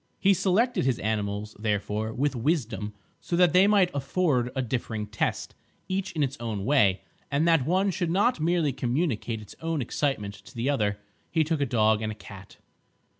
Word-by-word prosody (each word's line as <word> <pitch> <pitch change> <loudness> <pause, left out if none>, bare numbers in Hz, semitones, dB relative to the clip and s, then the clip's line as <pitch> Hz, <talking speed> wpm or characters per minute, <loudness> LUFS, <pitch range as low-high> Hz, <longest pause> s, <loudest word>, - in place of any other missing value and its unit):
He 200 0 +5
selected 195 +7 +2
his 130 -2 +1
animals, 105 0 -2
therefore, 105 0 -1
with 135 +4 -1
wisdom 115 -6 -1 0.2
so 175 - -3
that 175 -1 +4
they 185 +2 +6
might 200 -4 +4
afford 140 -2 +1
a 130 - 0
differing 115 -3 -3
test, 105 -1 -2 0.3
each 190 0 -2
in 155 - 0
its 135 0 -2
own 110 -4 -3
way, 105 -9 +3 0.3
and 150 +4 +1
that 165 -6 +3
one 190 +3 +2
should 175 -1 -2
not 200 +5 +2
merely 160 -3 +1
communicate 125 -3 -1
its - - -13
own 165 -1 -1
excitement 120 -5 -1
to 130 +5 -15
the 120 +5 0
other. 105 -7 0 0.3
He 160 -1 +2
took 155 -1 -1
a 140 - +1
dog 110 -2 +3
and 110 -1 -2
a - - -7
cat. 100 -2 -12
135 Hz, 180 wpm, -27 LUFS, 110-170 Hz, 0.3 s, they